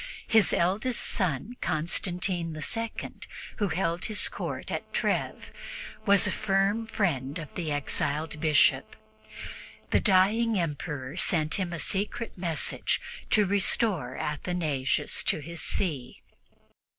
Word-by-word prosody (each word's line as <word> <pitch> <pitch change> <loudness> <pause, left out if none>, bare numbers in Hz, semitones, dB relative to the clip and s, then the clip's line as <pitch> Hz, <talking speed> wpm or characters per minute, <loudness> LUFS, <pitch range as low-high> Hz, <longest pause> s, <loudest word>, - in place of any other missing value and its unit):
His 220 -4 +5
eldest 205 +8 +1
son, 190 - 0
Constantine 175 +1 0
II, 230 +7 -3 0.5
who 205 - +1
held 170 0 -1
his 215 - +2
court - - -5
at - - -4
Treves, - - -1 0.6
was 200 -1 +7
a - - +1
firm 200 +2 +1
friend 145 - -1
of 155 -3 -8
the 165 -5 -3
exiled 145 +2 -1
Bishop; 150 -4 +3 1.0
the - - +5
dying 210 +4 +3
Emperor 150 -3 -3
sent 155 -4 +2
him 185 -2 -2
a 170 - -3
secret 205 +7 -1
message 170 -4 0 0.3
to 210 -1 +4
restore 190 - 0
Athanasius 150 -3 -1
to - - +2
his 170 +3 -6
see. 145 -10 -2
175 Hz, 115 wpm, -28 LUFS, 150-200 Hz, 1.0 s, was